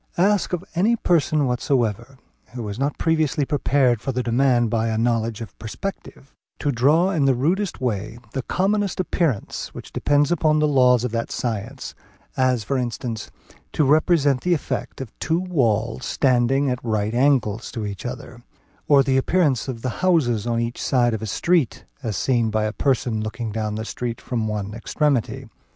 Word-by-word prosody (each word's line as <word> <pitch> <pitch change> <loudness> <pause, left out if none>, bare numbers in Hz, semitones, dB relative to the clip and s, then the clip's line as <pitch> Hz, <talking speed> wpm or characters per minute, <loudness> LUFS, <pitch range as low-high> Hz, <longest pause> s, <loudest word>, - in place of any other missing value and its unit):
Ask 200 +2 +2
of 180 -1 -2
any 205 +7 +3
person 155 - +2
whatsoever, 125 -1 -1 0.4
who 120 -4 -4
is 100 +3 -6
not 140 +2 -1
previously 155 -3 +1
prepared 130 -5 +2
for 135 - -2
the 125 0 -2
demand 120 -1 +2
by 115 0 +1
a 110 -1 -1
knowledge 115 -1 0
of 115 - -8
perspective, 135 - -7 0.2
to 145 - 0
draw 150 +9 +3
in 155 -7 +1
the 135 -2 +4
rudest 175 +10 0
way 110 -2 -2 0.2
the 135 - -1
commonest 200 +7 0
appearance 165 - -2
which - - -10
depends 145 +1 +2
upon 155 -2 +2
the 150 0 +3
laws 125 -4 +4
of 125 - -2
that 115 0 -2
science; 120 +3 -4 0.4
as 130 -3 +2
for 135 +4 -1
instance, 115 -2 -4 0.4
to 155 - +2
represent 145 -2 +3
the 180 -1 +2
effect 145 - -4
of 125 -5 -8
two 165 +1 0
walls 125 - 0
standing 135 +1 +2
at 125 - -4
right 110 -2 -1
angles 120 -4 +1
to 110 -2 -4
each 100 -2 -6
other, 125 -1 -7 0.5
or 140 -2 +6
the 130 0 +1
appearance 140 - +1
of 120 -4 -5
the 130 - -3
houses 125 - +2
on 115 -1 0
each 115 +1 -3
side 120 -3 +2
of 110 - -3
a 110 - -4
street, 165 - 0 0.2
as 110 -8 -3
seen 120 -4 +1
by 110 0 0
a 110 0 -1
person 120 -5 0
looking 110 +1 -4
down 105 0 -2
the 110 +1 -4
street 120 0 -4
from 115 -3 -2
one 105 -1 -3
extremity. 130 +2 -1
125 Hz, 175 wpm, -22 LUFS, 115-145 Hz, 0.5 s, or